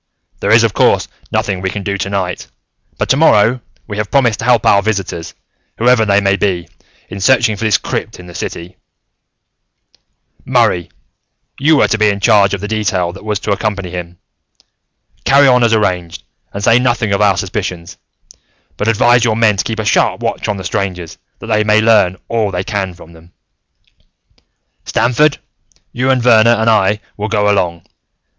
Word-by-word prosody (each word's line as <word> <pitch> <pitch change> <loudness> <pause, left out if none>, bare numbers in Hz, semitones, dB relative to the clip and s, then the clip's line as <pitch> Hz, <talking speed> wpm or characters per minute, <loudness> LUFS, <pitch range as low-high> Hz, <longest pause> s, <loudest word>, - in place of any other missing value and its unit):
There - - -2
is, - - +5
of - - +1
course, - - +2 0.2
nothing 95 -2 -1
we 95 - -2
can 100 +1 -6
do 100 +1 -2
tonight. 100 -2 -3 0.5
But, - - -2
tomorrow, 125 -4 +3 0.2
we 105 - -7
have 105 -1 -3
promised 120 -6 +1
to - - -4
help 120 -3 +2
our 100 - +4
visitors, 95 -6 -4 0.4
whoever 120 -1 +3
they 100 -1 +3
may 100 0 +1
be, 90 -5 -1 0.4
in 100 - -8
searching 120 0 +2
for 105 - -5
this 110 - +3
crypt - - -5
in 90 - -11
the 90 - -12
city. 85 +2 -7 1.7
"Murray, 85 -1 +1 0.7
you 150 +2 +3
were - - +3
to 110 - -1
be 105 -1 +3
in 100 0 -2
charge 100 0 +3
of 95 - -9
the 105 - -4
detail 100 -5 -1
that 95 - -12
was 105 -1 -2
to 105 - -3
accompany 100 -3 -2
them. 90 -1 -7 1.1
Carry 140 +1 +4
on 125 -2 +4
as 115 - +2
arranged, 90 -6 -1 0.3
and 100 - -6
say 115 +3 +4
nothing 120 -4 0
of 100 - 0
our 100 -2 +3
suspicions, 90 -3 -5 0.8
but 105 - -2
advise 120 +2 +3
your 115 -2 +1
men 110 -2 +3
to - - 0
keep 115 - -4
a 110 - -3
sharp - - +1
watch - - -3
on 105 - -2
the 95 - -7
strangers, 90 -2 -4 0.2
that - - -11
they 110 -1 +1
may 105 0 +3
learn 105 -5 +3
all 115 -3 -1
they 90 -1 -3
can 95 -3 -4
from 85 0 -15
them. 80 +2 -19 1.5
"Stamford, 140 +5 +1 0.5
you 130 +2 -1
and 130 -2 +1
Verner 115 -1 +5
and 110 +1 +1
I 105 0 +1 0.2
will 105 +1 -3
go 105 -1 +1
along. 85 -4 -1
105 Hz, 180 wpm, -14 LUFS, 95-115 Hz, 1.7 s, is